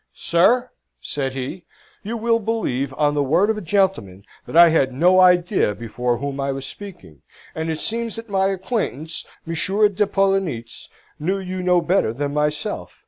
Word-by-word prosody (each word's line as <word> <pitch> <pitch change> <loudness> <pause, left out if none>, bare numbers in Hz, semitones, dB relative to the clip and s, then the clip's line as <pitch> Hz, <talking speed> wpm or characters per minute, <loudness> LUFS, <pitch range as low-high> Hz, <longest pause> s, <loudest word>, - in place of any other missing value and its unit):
"Sir," 240 +9 +2 0.3
said 135 -2 -3
he, 140 +7 -6 0.4
"you 230 +3 -4
will 230 +1 +1
believe, 200 - -2
on 145 -1 +2
the 145 - 0
word 170 +10 +2
of 220 - -3
a - - -8
gentleman, 170 - -1 0.2
that - - -2
I 170 0 +9
had 140 -5 +2
no 175 +8 +4
idea 180 - +3
before 120 +2 -2
whom 140 +2 -5
I 140 0 -1
was 135 0 -5
speaking, 175 - -10 0.3
and 160 +1 -3
it 160 - -2
seems 230 +4 -1
that 225 0 -8
my 195 -2 +1
acquaintance, 190 - -3 0.2
Monsieur 190 +6 +1
de 205 +1 0
Poellnitz, 195 - -1 0.3
knew 185 +6 -1
you 185 -1 -5
no 180 -1 +3
better 170 - +1
than 145 +3 -3
myself. 150 0 -2
170 Hz, 170 wpm, -21 LUFS, 140-195 Hz, 0.4 s, I